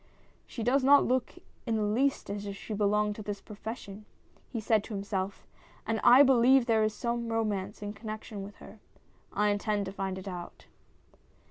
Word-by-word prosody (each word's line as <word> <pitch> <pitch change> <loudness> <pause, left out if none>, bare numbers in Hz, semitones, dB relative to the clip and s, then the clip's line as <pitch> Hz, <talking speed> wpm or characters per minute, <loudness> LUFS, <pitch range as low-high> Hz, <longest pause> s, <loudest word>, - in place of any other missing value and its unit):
" - - -33
She 230 - -5
does 260 +4 +2
not 280 +2 +6
look 255 0 0 0.3
in 230 - +1
the 215 - 0
least 235 +2 0
as 205 0 -5
if 200 - -5
she 215 - -7
belonged 210 0 +1
to - - -6
this 205 -1 -5
profession,'' 210 -1 -8 0.4
he 235 - -4
said 215 -1 +2
to 215 - -6
himself, 195 -1 -3 0.2
" - - -28
and 225 0 -1
I 255 +4 +9
believe 260 -1 +5
there 225 -2 +3
is 215 0 0
some 235 +1 -2
romance 210 -3 -2
in 205 0 -4
connection 215 -1 -7
with 200 +1 -9
her! 220 - -14 0.5
I 210 +1 +1
intend 205 0 0
to 190 - -5
find 195 -1 -3
it 190 +1 -8
out." 175 -2 -8
215 Hz, 195 wpm, -30 LUFS, 200-230 Hz, 0.5 s, I